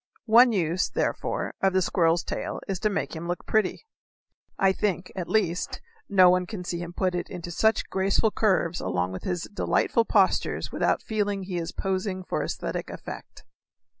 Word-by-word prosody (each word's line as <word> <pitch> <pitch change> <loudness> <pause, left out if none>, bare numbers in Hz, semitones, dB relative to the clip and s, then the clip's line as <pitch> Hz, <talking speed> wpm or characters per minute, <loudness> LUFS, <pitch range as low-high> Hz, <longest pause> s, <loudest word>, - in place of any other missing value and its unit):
One 240 +2 +7
use, 180 -3 0
therefore, - - -2
of 195 -1 +3
the 185 - +3
squirrel's 170 -1 +2
tail - - -4
is 195 -2 -2
to 215 - +1
make 200 - -2
him 165 +1 -5
look 175 0 -3
pretty. 220 - 0 0.7
I 195 0 +4
think, 190 -2 -2
at 180 -3 -4
least, 180 -5 0 0.3
no 190 -3 +7
one 180 0 +1
can 195 -3 -6
see 175 -1 -3
him 175 0 -6
put 185 +1 0
it 175 - -3
into 175 -2 -6
such 220 +6 +2
graceful 195 +3 +1
curves 185 -6 +1
along 90 0 -1
with 95 - -7
his 180 -2 -2
delightful 230 +2 +1
postures 195 -4 +2
without - - +1
feeling 205 -2 -1
that 185 - -8
he 180 -2 -1
is 165 - -4
posing 190 0 -2
for - - -2
esthetic - - -4
effect. - - -9
185 Hz, 180 wpm, -26 LUFS, 175-200 Hz, 0.7 s, One